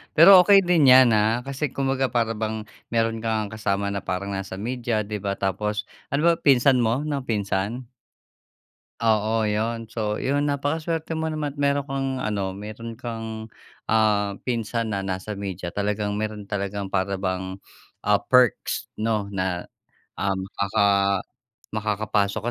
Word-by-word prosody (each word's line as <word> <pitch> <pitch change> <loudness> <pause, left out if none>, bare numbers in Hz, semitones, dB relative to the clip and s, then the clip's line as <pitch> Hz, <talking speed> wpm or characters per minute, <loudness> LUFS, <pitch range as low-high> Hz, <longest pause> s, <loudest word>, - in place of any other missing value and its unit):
pero 185 +4 +10
okey 200 -1 +7
din 175 -5 +3
'yan 130 -1 +8
ha, 110 +3 +2
kasi 140 +2 -3
kumbaga 135 -1 0
para 115 -1 +1
bang 110 0 -2 0.3
meron 115 0 +1
ka 115 - -4
ngang 110 -1 -2
kasama 100 -1 0
na 100 - -2
parang 95 +2 -3
nasa 95 -1 -5
media, 120 -2 -1
'di 105 +1 -4
ba? 100 0 -2
Tapos 105 +2 -2 0.3
ano 155 +4 +4
ba, - - +5
pinsan 135 -1 +5
mo 120 +4 +1
ng 140 -3 -2
pinsan? 105 +3 -2 1.2
Oo, 110 -1 +2
yun. 115 +2 -2
So, 105 -2 -2
yun, 145 +2 +1
napakaswerte 160 +3 -2
mo 160 - -2
naman 150 -2 -3
meron 140 0 0
kang 135 0 -2
ano, 100 -4 -2
meron 110 +3 -7
kang, 115 -2 -6 0.4
ah, 105 -2 +2
pinsan 115 -2 -2
na 100 - -1
nasa 95 +2 -4
media 95 -3 -5
talagang 105 0 -1
meron 105 -1 -4
talagang 100 -1 -4
para 100 0 0
bang, 95 0 -3 0.5
ah, 105 0 +3
perks 125 -4 +2
'no 110 -2 0
na, 95 -2 -2 0.5
ah, 95 +1 0
maka 100 +2 0 0.9
makakapasok 105 -1 0
110 Hz, 145 wpm, -24 LUFS, 100-125 Hz, 1.2 s, pero